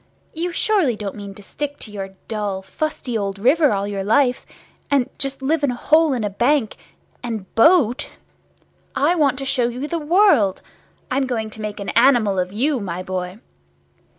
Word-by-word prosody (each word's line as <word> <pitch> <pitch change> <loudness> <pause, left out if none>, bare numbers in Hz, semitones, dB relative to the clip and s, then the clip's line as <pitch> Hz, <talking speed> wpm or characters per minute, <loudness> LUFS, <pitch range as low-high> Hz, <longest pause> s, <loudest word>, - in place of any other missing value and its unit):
You 345 +2 -2
surely 355 - +2
don't 205 -2 -5
mean 200 -2 -9
to 205 - -13
stick 285 +7 -5
to 215 - -8
your 195 -2 -7
dull 205 -3 -3
fusty 255 +2 -4
old 200 -2 -2
river 275 +8 +3
all 200 -1 0
your 200 -1 -3
life, 250 +5 +2 0.4
and 275 -4 +2
just 275 -1 -2
live 300 +2 +1
in 285 - +3
a 245 - -2
hole 310 +3 +3
in 240 -4 -2
a 205 - 0
bank, 240 +3 +1 0.5
and 225 -5 -6
boat? 270 -1 +4 0.9
I 300 +5 +3
want 290 -6 +2
to 270 - -5
show 265 -3 +1
you 250 +4 -4
the 335 +1 -2
world! 315 - +3 0.5
I'm 265 +1 +1
going 220 -3 -3
to 220 - -8
make 210 -1 -5
an 200 - -4
animal 230 -6 +4
of 180 0 -2
you, 260 +6 0
my 185 -3 -4
boy!" 185 +2 -5
245 Hz, 180 wpm, -21 LUFS, 205-285 Hz, 0.9 s, boat